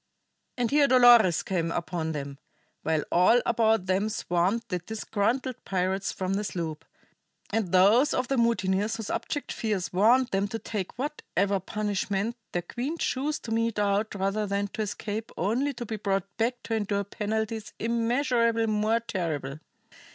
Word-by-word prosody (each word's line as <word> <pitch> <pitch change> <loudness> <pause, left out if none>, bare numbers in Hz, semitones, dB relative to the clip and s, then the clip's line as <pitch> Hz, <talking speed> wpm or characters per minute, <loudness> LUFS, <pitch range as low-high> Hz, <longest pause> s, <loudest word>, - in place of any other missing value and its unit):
And 245 -1 0
here 290 0 +5
Dolores 240 -8 +6
came 170 -3 -1
upon 165 -1 -2
them, 140 -2 -5 0.4
while 160 -1 0
all 180 +8 +5
about 225 -4 +2
them 190 +3 +1
swarmed 190 +3 0
the 180 -3 -1
disgruntled 225 +5 -2
pirates 190 +1 -1
from 185 0 -2
the 205 +2 -1
sloop, 165 -6 -4 0.7
and 215 -6 -1
those 205 +10 +5
of 255 - 0
the 275 - 0
mutineers 210 -3 +1
whose 225 -2 -5
abject 290 - -3
fears 205 -6 -2
warned 235 +7 +4
them 195 +1 0
to 225 - -4
take 210 -4 -5
whatever 200 - -1
punishment 205 +2 -2 0.2
their 175 - -2
queen 270 - -4
chose 295 +1 -1
to 225 - -7
mete 230 0 0
out 205 +1 +1
rather 200 +2 -1
than 200 +1 -1
to 220 - -4
escape 215 +1 -4
only 235 +10 0
to 240 -3 -6
be 220 0 -4
brought 195 -1 -2
back 240 +2 -1
to 225 - -4
endure 205 -2 0
penalties 220 +2 -3
immeasurably 230 0 +1
more 215 +1 +1
terrible. 155 -10 -3
210 Hz, 155 wpm, -27 LUFS, 190-230 Hz, 0.7 s, Dolores